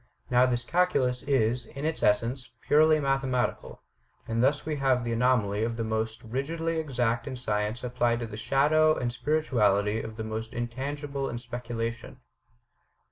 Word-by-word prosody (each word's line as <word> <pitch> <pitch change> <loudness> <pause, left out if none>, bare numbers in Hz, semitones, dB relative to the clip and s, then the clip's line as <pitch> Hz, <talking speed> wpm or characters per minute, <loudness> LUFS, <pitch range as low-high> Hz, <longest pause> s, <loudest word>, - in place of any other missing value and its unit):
Now 125 +1 +5
this 120 -1 -1
Calculus 140 -6 +1
is, 125 -3 +1
in 140 +2 -6
its 160 0 -1
essence, 115 +5 +1
purely 155 +1 +4
mathematical; 135 -3 -1 0.4
and 115 +1 0
thus 145 +2 +2
we 155 -1 -2
have 130 -3 +2
the 120 -1 -2
anomaly 115 -4 +2
of 115 0 -2
the 115 - -1
most 110 +1 -2
rigidly 160 +8 -2
exact 120 -6 -1
in 135 - -4
science 105 -1 -2
applied 120 -1 0
to - - -2
the 110 - -8
shadow 150 +7 +3
and 120 -1 -2
spirituality 110 -8 +1
of 110 -1 -7
the 110 - -5
most 110 +2 -5
intangible 135 +4 -3
in 120 - -4
speculation." 115 -1 -5
125 Hz, 155 wpm, -28 LUFS, 115-140 Hz, 0.4 s, Now